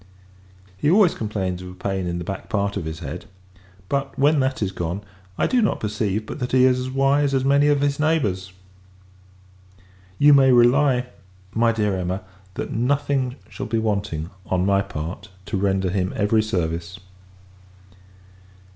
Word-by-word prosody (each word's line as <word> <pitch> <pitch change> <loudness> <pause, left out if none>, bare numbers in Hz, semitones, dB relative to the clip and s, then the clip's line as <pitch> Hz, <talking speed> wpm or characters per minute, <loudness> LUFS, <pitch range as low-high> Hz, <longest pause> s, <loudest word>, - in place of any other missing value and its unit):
He 145 - +1
always 190 0 +5
complains 95 -5 -3
of 90 - -8
a 90 - -11
pain 95 -1 -3
in 85 0 -2
the 85 - -4
back 95 +2 -6
part 100 -3 -1
of 95 -5 -3
his 80 -1 -6
head; - - -6 0.6
but, 140 +2 -2
when 145 +2 +4
that 130 0 0
is 95 - -1
gone, 90 +2 -4 0.3
I - - +2
do 250 -2 +2
not 210 - +1
perceive 105 0 -2
but - - -7
that 125 0 -3
he 130 0 +6
is 125 -1 +3
as 130 0 -3
wise 135 +1 +2
as 130 0 +1
many 140 +1 +4
of 145 -1 +3
his 140 0 0
neighbours. 105 - 0 1.7
You 145 0 +6
may 135 -2 +6
rely, 125 +1 +4 0.5
my 115 +1 +3
dear 105 -3 0
Emma, 95 +1 -3 0.3
that - - -4
nothing 130 +1 0
shall - - -6
be 115 +1 -1
wanting, 100 -7 -2 0.2
on 90 0 +1
my 100 0 +3
part, 90 +2 -6 0.2
to 100 0 -2
render 95 -1 0
him 95 -1 -1
every 110 +1 +2
service. 90 -2 -3
110 Hz, 165 wpm, -22 LUFS, 95-135 Hz, 1.7 s, he